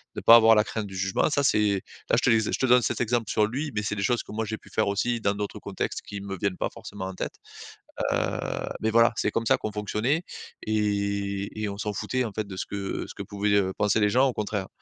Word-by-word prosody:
ne - - -4
pas 115 - +9
avoir 115 -1 +7
la 105 - +5
crainte 110 -1 -4
du 95 - -9
jugement 95 +7 +1
ça 145 -1 +1
c'est 105 -6 +2 0.3
là - - +4
je - - +3
les 115 - +5
je 110 - -1
te 130 - 0
donne 125 0 +6
cet - - -1
exemple 120 -2 0
sur 105 - +3
lui, 140 +7 -3
mais 105 - 0
c'est 105 - -2
des 100 - -3
choses 120 +3 +1
que - - -12
moi, 110 +1 -2
j'ai 110 +1 -4
pu - - -18
faire 110 - +2
aussi 115 +4 0
dans 100 -1 +1
d'autres 105 0 -4
contextes, - - -4
qui 100 -1 -7
me 100 -1 -5
viennent 95 -1 -1
pas - - -1
forcément 100 -2 -7
en 95 - -5
tête. - - -4 0.8
Heu, - - 0 0.5
mais, 110 - +1
voilà, 115 +1 +5
c'est - - +1
comme 115 0 -1
ça - - +5
qu'on 110 - -4
fonctionnait 105 - 0 0.4
et 100 -1 -1
et 105 - -1
on 100 - -6
s'en 105 -1 -2
foutait, 130 +5 -1
en 115 - -3
fait, 110 0 -3
de 95 - -7
ce - - -3
que 100 -1 -4
ce - - -9
que - - -5
pouvaient, 100 0 0
heu, 95 -2 +2
penser 105 +1 +2
les 105 -1 +3
gens, 130 +5 +4
au - - -3
contraire. 105 -3 -3
105 Hz, 265 wpm, -26 LUFS, 100-115 Hz, 0.8 s, pas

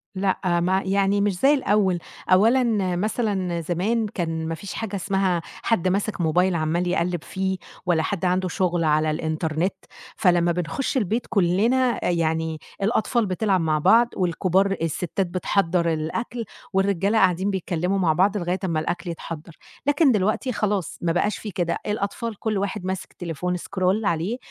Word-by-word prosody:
لأ 185 -2 +1
ما 185 +2 +2
يعني 200 +1 +2
مش 200 -3 0
زي 280 +6 +5
الأول. 200 -9 +2 0.3
أولًا 215 -2 +3
مثلًا 195 -3 -1
زمان 200 +7 0
كان 165 -5 -3
ما 165 - -2
فيش 190 +4 -8
حاجة 215 -3 -4
اسمها 190 -2 0 0.2
حد 185 -6 +1
ماسك 200 0 0
موبايل 180 +3 +2
عمّال 170 +3 0
يقلّب 175 -2 0
فيه، 190 0 -2 0.3
ولا 165 -3 +2
حد 195 -2 -2
عنده 185 +1 +1
شُغل 175 -2 0
على 155 0 +2
الإنترنت. 160 +3 -1 0.4
فلمّا 175 -4 +3
بنخش 180 - -2
البيت 225 +1 -1
كُلنا 225 +6 +2
يعني 160 -1 -1 0.2
الأطفال 220 +2 +1
بتلعب 190 0 +1
مع 155 -2 +1
بعض 230 +9 +5
والكبار 185 +2 +1
الستات 175 +3 -1
بتحضّر 175 -2 +1
الأكل، 220 +10 -3 0.3
والرجالة 195 +2 +2
قاعدين 190 -1 +3
بيتكلموا 180 0 -1
مع 165 -4 +3
بعض 195 +5 +2
لغاية 180 0 -1
أمّا 165 -3 0
الأكل 175 +3 -3
يتحضر. 165 -1 -7 0.3
لكن 290 -1 +4
دلوقتي 215 +4 +1
خلاص 205 -6 -1
ما 170 - +1
بقاش 205 +5 0
في 210 - -6
كده. 170 -2 -1
الأطفال 210 +1 -3
كل 215 -2 -1
واحد 195 0 -3
ماسك 190 0 -4
تليفون 175 +1 -3
scroll 190 +3 -1
عليه، 175 +8 0
185 Hz, 150 wpm, -24 LUFS, 170-205 Hz, 0.4 s, زي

